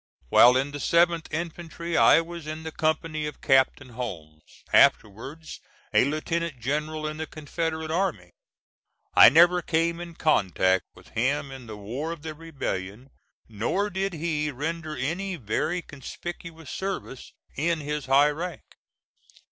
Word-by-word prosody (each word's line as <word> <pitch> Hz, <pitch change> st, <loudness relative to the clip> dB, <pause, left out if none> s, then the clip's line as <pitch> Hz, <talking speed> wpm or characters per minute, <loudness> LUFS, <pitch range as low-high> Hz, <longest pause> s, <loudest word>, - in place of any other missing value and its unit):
While 125 Hz, +1 st, +7 dB
in 135 Hz, +2 st, -1 dB
the 145 Hz, -, -6 dB
7th 170 Hz, +1 st, +2 dB
infantry 170 Hz, +1 st, -4 dB
I -, -, +6 dB
was 170 Hz, -2 st, -8 dB
in 155 Hz, +1 st, -5 dB
the 160 Hz, -, -5 dB
company 155 Hz, 0 st, -1 dB
of 150 Hz, -, -8 dB
Captain 130 Hz, -1 st, +2 dB
Holmes, 80 Hz, -11 st, -8 dB
afterwards 135 Hz, +10 st, +2 dB, 0.3 s
a -, -, +5 dB
Lieutenant 155 Hz, 0 st, -2 dB
general 150 Hz, +5 st, -2 dB
in 155 Hz, 0 st, -4 dB
the 160 Hz, 0 st, -4 dB
Confederate 160 Hz, +1 st, -4 dB
army. 160 Hz, -, -1 dB, 0.8 s
I -, -, +10 dB
never 175 Hz, +5 st, +5 dB
came 170 Hz, 0 st, 0 dB
in 170 Hz, -1 st, -8 dB
contact 95 Hz, -, +2 dB
with -, -, -17 dB
him 135 Hz, +4 st, -1 dB
in 130 Hz, -3 st, -10 dB
the 110 Hz, -1 st, -8 dB
war 125 Hz, +11 st, -4 dB
of 165 Hz, -3 st, -8 dB
the 160 Hz, -1 st, -5 dB
Rebellion, 130 Hz, -7 st, -5 dB, 0.4 s
nor 120 Hz, -, -1 dB
did 195 Hz, +1 st, -2 dB
he 155 Hz, -2 st, -1 dB
render 155 Hz, +3 st, -4 dB
any 175 Hz, +9 st, -2 dB
very 165 Hz, -, -2 dB
conspicuous 165 Hz, +2 st, -8 dB
service 190 Hz, -9 st, -5 dB, 0.2 s
in 165 Hz, +3 st, 0 dB
his 150 Hz, -2 st, -4 dB
high 140 Hz, +3 st, +5 dB
rank. 170 Hz, +3 st, -5 dB
155 Hz, 140 wpm, -26 LUFS, 130-170 Hz, 0.8 s, I